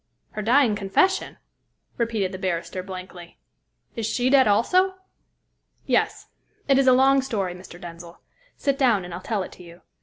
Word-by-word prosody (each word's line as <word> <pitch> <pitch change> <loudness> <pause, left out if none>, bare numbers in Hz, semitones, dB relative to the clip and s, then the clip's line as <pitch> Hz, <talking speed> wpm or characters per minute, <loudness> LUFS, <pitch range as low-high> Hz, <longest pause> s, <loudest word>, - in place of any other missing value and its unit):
"Her 215 - -5
dying 235 0 +3
confession?" 210 - +1 0.6
repeated 225 -5 -1
the 185 - -7
barrister 185 0 -3
blankly. 185 -2 -10 0.6
"Is 225 -2 -2
she 250 +3 0
dead, 270 -4 +6
also?" 365 - +3 0.9
"Yes. - - 0 0.4
It 275 -1 +4
is 270 - +2
a - - +8
long 270 +1 +4
story, 200 -9 -2
Mr. 180 -1 -12
Denzil. 170 0 -11 0.4
Sit 280 0 -1
down, 230 -9 +3
and 175 - -8
I'll 175 - -6
tell 205 -1 -2
it - - -9
to - - -14
you. 170 0 -15
210 Hz, 160 wpm, -24 LUFS, 185-260 Hz, 0.9 s, a